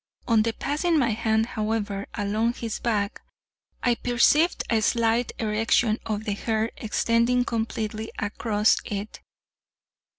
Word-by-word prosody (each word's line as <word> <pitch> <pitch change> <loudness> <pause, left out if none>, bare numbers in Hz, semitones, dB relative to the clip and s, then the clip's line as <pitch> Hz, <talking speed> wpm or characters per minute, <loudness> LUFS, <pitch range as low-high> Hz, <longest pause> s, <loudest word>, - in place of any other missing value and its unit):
On 225 -3 +4
passing 290 +9 0
my 245 -6 +2
hand, 220 0 +1
however, 215 -3 -2
along 215 +3 0
his 230 -2 -4
back, 210 -4 -1 0.6
I 245 - +4
perceived 250 +8 +2
a 225 -2 +2
slight 230 +1 +1
erection 220 +1 +1
of 215 -1 -2
the 210 - -1
hair 220 +2 -1
extending 235 +3 +1
completely 220 -1 -3
across 210 0 +1
it. 205 +1 -6
225 Hz, 120 wpm, -25 LUFS, 215-235 Hz, 0.6 s, On